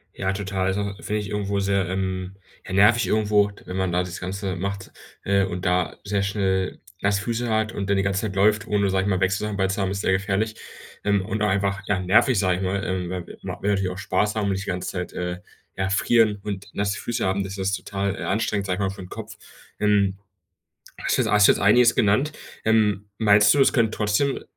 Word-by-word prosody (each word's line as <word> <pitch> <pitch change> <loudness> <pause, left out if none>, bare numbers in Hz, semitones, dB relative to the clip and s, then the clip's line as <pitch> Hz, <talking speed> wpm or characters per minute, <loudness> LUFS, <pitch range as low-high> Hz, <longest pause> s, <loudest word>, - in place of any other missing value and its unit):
Ja, 95 0 -1
total. 95 -1 -2
Also, 100 +1 -1
finde 105 - -2
ich 100 - -6
irgendwo 100 -1 -1
sehr, 100 -1 +1
ähm, 95 0 -3 0.3
ja, - - -6
nervig 105 +4 +5
irgendwo, 105 -1 +2
wenn 90 - -6
man 95 -2 0
da 90 - +2
das 90 0 -7
Ganze 95 0 -4
macht, 100 +1 -4 0.3
äh, 100 0 +2
und 90 -1 -4
da 90 -1 0
sehr 100 -1 -1
schnell 95 -2 -1 0.2
nasse 100 0 +2
Füße 120 +2 -2
hat 110 0 +1
und 100 0 -4
dann 100 - +3
die 95 - +1
ganze 95 -1 0
Zeit 100 -3 -4
läuft, 105 +2 +3
ohne, 100 -1 +1
sage 95 -1 +1
ich - - 0
mal, 95 - +1
Wechselsachen 100 +2 0
bei 95 -1 +2
zu 95 +1 -2
haben, 95 - 0
ist 100 - -3
sehr 95 - +1
gefährlich. 100 +3 0 0.5
Ähm, 100 -2 +1
und 110 +1 -3
auch 105 - +3
einfach, 100 0 0
ja, 100 -2 +1
nervig, 105 +6 +3
sage 95 -2 +2
ich 95 - -5
mal, 95 +1 -1
ähm, 90 -2 -2
weil 90 -2 -4 0.2
man - - -6
will 105 - +2
natürlich 95 -2 0
auch 90 - -7
Spaß 105 +1 0
haben 110 - 0
und 100 - +1
nicht 95 +1 -3
die - - -5
ganze 90 -1 -3
Zeit, 90 -2 -5
äh, 90 0 -4 0.4
erfrieren 105 +3 +2
und 100 -2 -5
nasse 100 0 -1
Füße 120 - -2
haben, 95 +1 0
das 95 +1 -6
ist 95 0 -1
total, 100 +1 -3
äh, - - -6
anstrengend, 100 0 -1
sage 90 - 0
ich 95 - -7
mal, 95 - +1
für' 95 - -10
n 90 - -10
Kopf. - - -8 0.4
Hm, 100 -2 +2 0.8
hast - - +1
du - - +4
jetzt 110 - -1
hast 105 -1 +6
jetzt - - +4
einiges 115 +4 +5
genannt. 110 +9 +2 0.3
Ähm, 105 -2 +2
meinst 105 0 +5
du, 140 - +2
es - - +5
können 115 -3 +2
trotzdem 105 +7 0
100 Hz, 230 wpm, -24 LUFS, 95-105 Hz, 0.8 s, hast